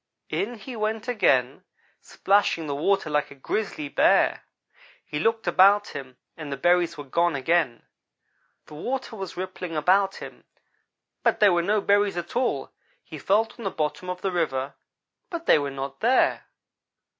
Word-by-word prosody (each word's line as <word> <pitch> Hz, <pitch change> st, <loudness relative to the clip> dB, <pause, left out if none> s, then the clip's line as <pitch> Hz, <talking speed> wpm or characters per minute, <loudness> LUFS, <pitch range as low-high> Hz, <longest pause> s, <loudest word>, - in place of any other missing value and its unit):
"In 240 Hz, +4 st, -2 dB
he 235 Hz, +3 st, -9 dB
went 220 Hz, +1 st, -2 dB
again 135 Hz, -, +1 dB, 0.4 s
splashing 195 Hz, -4 st, +1 dB
the 145 Hz, -, -3 dB
water 165 Hz, +5 st, +1 dB
like 150 Hz, 0 st, 0 dB
a -, -, -12 dB
Grizzly 155 Hz, +1 st, -3 dB
Bear. -, -, +3 dB, 0.6 s
He 150 Hz, -, -4 dB
looked 225 Hz, +6 st, 0 dB
about 200 Hz, +2 st, +5 dB
him 130 Hz, -3 st, -9 dB, 0.2 s
and 155 Hz, -3 st, -8 dB
the 140 Hz, -, -3 dB
berries 175 Hz, +3 st, +2 dB
were 145 Hz, -, -6 dB
gone 170 Hz, +4 st, +1 dB
again. 140 Hz, -2 st, 0 dB, 0.8 s
The -, -, -14 dB
water 245 Hz, -, -4 dB
was 195 Hz, -5 st, -7 dB
rippling 180 Hz, -3 st, -5 dB
about 190 Hz, +5 st, +3 dB
him, -, -, -11 dB, 0.8 s
but -, -, +1 dB
there 205 Hz, -3 st, +5 dB
were 175 Hz, -, +2 dB
no 205 Hz, +4 st, +1 dB
berries 200 Hz, -1 st, +2 dB
at 175 Hz, 0 st, -5 dB
all. 245 Hz, 0 st, -1 dB, 0.3 s
He -, -, -10 dB
felt 220 Hz, +4 st, +1 dB
on -, -, -7 dB
the 195 Hz, -, -1 dB
bottom 155 Hz, +2 st, -3 dB
of 180 Hz, 0 st, -5 dB
the 195 Hz, -, -1 dB
river 140 Hz, -6 st, -1 dB, 0.6 s
but 340 Hz, -3 st, -6 dB
they -, -, +5 dB
were 145 Hz, -1 st, -2 dB
not 135 Hz, 0 st, -6 dB
there. 245 Hz, +4 st, +2 dB
180 Hz, 165 wpm, -25 LUFS, 150-205 Hz, 0.8 s, about